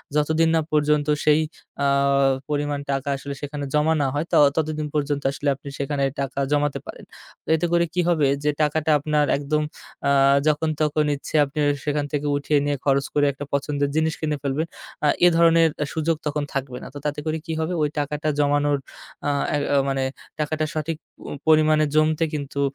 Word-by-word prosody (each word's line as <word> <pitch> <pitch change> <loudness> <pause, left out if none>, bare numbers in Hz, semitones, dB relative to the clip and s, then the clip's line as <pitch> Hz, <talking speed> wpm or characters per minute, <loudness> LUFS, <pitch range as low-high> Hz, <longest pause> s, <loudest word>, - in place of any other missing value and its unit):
যতদিন 160 +2 +2
না 160 - +3
পর্যন্ত 150 -1 +2 0.2
সেই 150 +1 +4 0.4
আ - - +4 0.6
পরিমাণ 145 -1 -1
টাকা 135 +1 -2
আসলে 140 +1 -6
সেখানে 145 0 -4
জমা 150 +2 +3
না 140 - +2
হয় 145 +3 -1
ত - - -15 0.4
তদিন 155 -1 -3
পর্যন্ত 145 -1 -1
আসলে 140 +1 -2
আপনি 140 +1 -10
সেখানে 140 0 -1 0.2
টাকা 135 0 -3
জমাতে 145 -1 +1
পারেন। - - -10 0.4
তো - - -58
এতে 160 +2 0
করে 170 0 +4
কি 180 - +2
হবে? 160 -5 +3 0.2
যে 150 - +2
টাকাটা 155 +1 +1
আপনার 150 0 +1
একদম 150 +2 -1 0.4
আ - - +3 0.4
যখন-তখন 155 0 +1
ইচ্ছে 140 - -8
আপনি 140 +2 -6 0.3
সেখান 145 -1 0
থেকে 145 -1 -1
উঠিয়ে 145 +1 +1
নিয়ে 145 -1 0
খরচ 140 -1 +2
করে 145 -1 +3
একটা 140 +1 -7
পছন্দের 140 0 0
জিনিস 160 0 +1
কিনে 150 -2 -1
ফেলবেন, 145 +4 -1 0.4
আ - - +5 0.2
এ - - +9
ধরনের 165 -1 +5 0.2
সুযোগ 160 +1 0
তখন 150 0 -1
থাকবে 130 -2 -3
না। - - -7
তো - - -7
তাতে 150 0 -1
করে 155 0 -1
কি 165 - -3
হবে? 160 +3 -1
ওই 150 - +2
টাকাটা 150 +1 -2
জমানোর 145 0 +2 0.5
আ - - +2 0.2
অ্যা - - +1 0.3
মানে 135 -1 0 0.4
টাকাটা 155 +1 -1
সঠিক 155 +1 -2 0.2
প - - -30 0.3
পরিমাণে 155 -1 +5
জমতে 155 +1 +3
কিন্তু 140 -1 -4
150 Hz, 180 wpm, -23 LUFS, 145-155 Hz, 0.6 s, এ